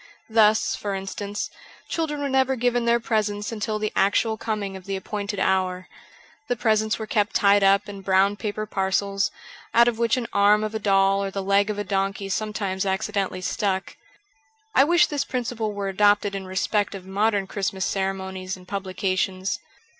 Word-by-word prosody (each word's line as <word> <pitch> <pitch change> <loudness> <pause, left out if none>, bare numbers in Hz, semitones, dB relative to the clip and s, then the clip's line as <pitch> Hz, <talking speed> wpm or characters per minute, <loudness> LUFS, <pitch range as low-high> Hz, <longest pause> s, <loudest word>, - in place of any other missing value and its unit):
Thus, 220 -1 +4
for 200 -1 -3
instance, 200 +1 -4 0.4
children 300 -3 -2
were 285 - 0
never 265 0 +2
given 245 -1 +1
their 235 0 +3
presents 210 -2 -1
until 215 -1 -2
the 215 0 -2
actual 220 +3 +2
coming 210 -3 -3
of 190 -1 -10
the 195 - -3
appointed 205 +1 -4
hour. 185 -1 0 0.6
Jhe 245 - 0
presents 220 -1 +1
were 220 - -5
kept 215 -1 0
tied 200 0 +5
up 195 0 +4
in 200 -1 -8
brown 195 +1 +3
paper 215 0 -4
parcels, 195 0 0 0.5
out 235 +1 +7
of 235 -1 0
which 235 +1 +2
an 245 - -2
arm 205 +1 +4
of 215 0 -3
a 220 - -2
doll 195 -1 +3
or 195 - -2
the 195 0 -4
leg 200 +2 +3
of 210 - -2
a 205 - -1
donkey 195 +1 -2
sometimes 200 -1 -2
accidentally 195 -1 -1
stuck. 190 0 -2 0.8
I 270 - +6
wish 345 +3 +5
this 290 -2 -1
principle 235 -3 -3
were 200 -1 -3
adopted 205 +1 +3
in 195 -1 -5
respect 200 +2 0
of 190 -2 -9
modern 200 +1 +1
Christmas 190 -1 -2
ceremonies 190 -1 -3
and 180 -1 -16
publications. 190 -1 -2
205 Hz, 175 wpm, -24 LUFS, 195-215 Hz, 0.8 s, out